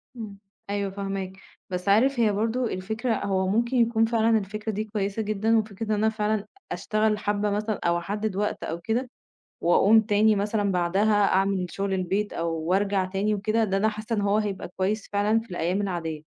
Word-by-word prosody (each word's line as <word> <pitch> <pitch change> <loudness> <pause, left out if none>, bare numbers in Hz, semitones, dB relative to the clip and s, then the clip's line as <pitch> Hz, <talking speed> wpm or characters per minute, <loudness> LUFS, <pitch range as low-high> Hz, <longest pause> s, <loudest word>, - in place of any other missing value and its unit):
إمم، 215 -4 -7 0.3
أيوه 200 -1 -1
فاهماك. 195 -1 -4 0.4
بس 180 +1 -3
عارف 245 +6 +4
هي 220 -3 +4
برضه 225 +5 0
الفكرة 220 +4 -2
هو 190 -1 +1
ممكن 235 +6 +1
يكون 230 -1 +3
فعلًا 225 0 +3
الفكرة 215 +2 -4
دي 215 +1 -2
كويسة 210 -1 -2
جدًا، 215 +1 +1
وفكرة 220 0 -2
إن 215 - -3
أنا 215 +1 +2
فعلًا 215 -1 -1 0.3
أشتغل 215 0 0
حبّة 205 0 0
مثلًا 210 +1 -1
أو 170 0 +3
أحدِّد 205 +3 -3
وقت 210 +1 -2
أو 165 - -4
كده 230 +8 -2 0.5
وأقوم 205 +6 +5
تاني 215 0 +3
مثلًا 205 0 0
بعدها 190 +4 +2 0.2
أعمل 195 -1 +1
شُغل 195 +2 -2
البيت 190 +3 -1
أو 165 0 -2
وارجع 190 +4 +1
تاني 200 +3 0
وكده، 215 +3 +1
ده 195 -2 0
أنا 215 +2 +2
حاسّة 215 +2 -4
إن 205 - 0
هو 205 +1 +2
هيبقي 205 -4 -2
كويس 200 +3 -1
فعلًا 210 +2 +3
في 225 -1 -12
الأيام 175 +3 -1
العاديّة. 165 -5 -3
205 Hz, 185 wpm, -26 LUFS, 195-220 Hz, 0.5 s, وأقوم